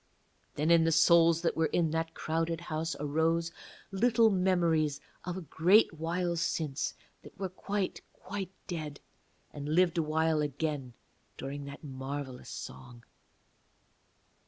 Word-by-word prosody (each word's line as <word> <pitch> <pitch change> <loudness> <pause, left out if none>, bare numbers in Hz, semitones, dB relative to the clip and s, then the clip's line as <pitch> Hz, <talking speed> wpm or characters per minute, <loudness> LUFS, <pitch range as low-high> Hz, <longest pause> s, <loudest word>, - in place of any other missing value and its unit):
Then 155 +3 +1
in 165 -1 +6
the 165 - +3
souls 165 0 +5
that 165 - +1
were 160 0 +2
in 165 -3 +1
that 165 0 -2
crowded 165 +1 -1
house 165 -1 -3
arose 160 +3 +1 0.4
little 225 +2 +4
memories 170 -6 +2 0.3
of 180 0 -3
a - - -4
great 175 +6 +4
while 170 +2 -1
since 155 -4 -1 0.3
that - - -14
were 190 -1 -2
quite 195 +1 -3
quite 190 -1 -6 0.2
dead, 155 -5 -5 0.5
and 145 0 -5
lived 175 -1 +4
awhile 160 0 +2
again 145 -3 -2 0.4
during 140 +1 -5
that 140 +2 -9
marvellous 135 -1 -6
song. 120 - -9
165 Hz, 130 wpm, -31 LUFS, 150-175 Hz, 0.5 s, in